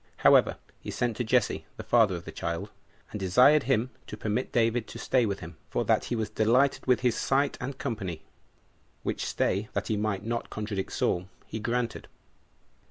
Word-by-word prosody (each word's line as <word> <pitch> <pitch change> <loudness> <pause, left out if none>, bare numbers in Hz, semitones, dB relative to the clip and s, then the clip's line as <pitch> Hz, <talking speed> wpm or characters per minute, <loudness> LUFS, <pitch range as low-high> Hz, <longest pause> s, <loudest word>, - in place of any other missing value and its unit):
However, - - +6 0.2
he - - -8
sent 120 -2 -1
to 125 - 0
Jesse, 120 0 +1
the - - -6
father 110 -6 +4
of 85 - -7
the - - -7
child, 85 0 -4 0.4
and 105 - -5
desired 125 +10 +5
him 125 0 +2 0.2
to 105 - -7
permit 110 +4 -2
David 115 -1 +1
to - - -9
stay 125 -3 +2
with 100 -1 -3
him, 80 -1 -9
for - - -1
that - - +2
he 120 - -2
was 110 -2 -1
delighted 125 +7 +2
with 125 -1 +3
his 125 -2 +2
sight 140 +1 +1
and 130 +2 -4
company; 100 - -4 0.8
which - - -2
stay, 100 +3 0
that 100 +1 -2
he 110 - +1
might 105 -1 -1
not 115 +1 -2
contradict 105 -3 -4
Saul, 90 +2 0 0.2
he 110 - -5
granted. 120 +1 -2
110 Hz, 185 wpm, -28 LUFS, 100-125 Hz, 0.8 s, However